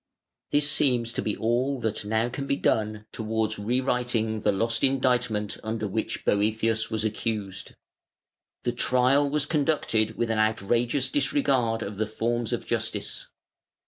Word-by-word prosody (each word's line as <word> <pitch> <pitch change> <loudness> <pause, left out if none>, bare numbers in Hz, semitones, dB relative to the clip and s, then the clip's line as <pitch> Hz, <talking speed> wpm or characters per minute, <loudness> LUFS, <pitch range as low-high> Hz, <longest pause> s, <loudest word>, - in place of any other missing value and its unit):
This 145 0 +3
seems 120 -5 +2
to - - -1
be 105 - -2
all 125 +4 0
that 110 -2 -1
can 105 - -7
now 110 +2 +1
be 140 +2 -2
done 110 -4 0
towards 110 -1 -2
re 120 +5 0
writing 120 -4 0
the - - +3
lost 115 +3 0
indictment 125 -6 +1
under 110 -1 -2
which 110 +3 -3
Boëthius 110 +2 +1
was 110 -1 -1
accused. 105 -3 -3 0.9
The 120 - +1
trial 130 +4 +3
was 150 0 +1
conducted 140 -8 0
with 115 -1 0
an 110 - 0
outrageous 115 +5 +1
disregard 135 -5 +1
of 100 0 -6
the 110 0 0
forms 115 +1 -1
of - - -2
justice. - - -2
115 Hz, 145 wpm, -26 LUFS, 110-125 Hz, 0.9 s, This